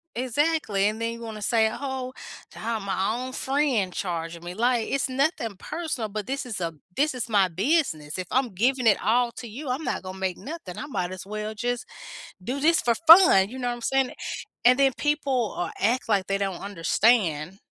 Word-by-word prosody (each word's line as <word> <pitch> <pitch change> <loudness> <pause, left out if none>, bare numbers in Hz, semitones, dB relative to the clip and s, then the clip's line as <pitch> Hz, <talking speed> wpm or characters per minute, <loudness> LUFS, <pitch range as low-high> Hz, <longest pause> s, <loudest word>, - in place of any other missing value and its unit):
Exactly, 255 -4 +1
and 220 +1 -6
then 230 0 -1
you 230 - -9
wanna 220 -2 -7
say, 220 +1 +3
"Oh, 265 0 -4 0.4
to - - -13
have 225 0 -2
my 195 +1 -1
own 255 +1 -4
friend 265 -9 0
charging 170 -2 -4
me," 175 +1 -6
like, 235 +2 +1
it's 275 0 0
nothing 265 - -1
personal, 300 - -4
but 210 0 -5
this 275 +1 -3
is 230 -6 -5
a 165 -2 -2 0.2
this 295 +2 +2
is 240 -2 -4
my 200 -3 +4
business. 185 - 0
If 185 -1 -4
I'm 255 -4 0
giving 245 +5 +1
it 210 - +4
all 240 +2 +2
to 240 - -8
you, 255 +6 -7
I'm 265 +5 -2
not - - -2
gonna 185 0 -7
make 190 -2 -2
nothing. 285 - -8
I - - -4
might 180 -10 -2
as 185 - -8
well 215 +1 -4
just 245 +2 -2 0.6
do 255 +8 -3
this 325 +3 +4
for 235 - +2
fun, 325 - +9
you 250 +5 -9
know 245 -1 -2
what 240 - -2
I'm 240 - -11
saying? 265 +2 +1 0.5
And 250 +1 +7
then 275 -1 +4
people, 280 -6 0
uh, 175 - -2
act 230 +4 +1
like 195 -3 +2
they 195 - +1
don't 195 -3 -3
understand 195 -2 +1
230 Hz, 205 wpm, -25 LUFS, 195-265 Hz, 0.6 s, fun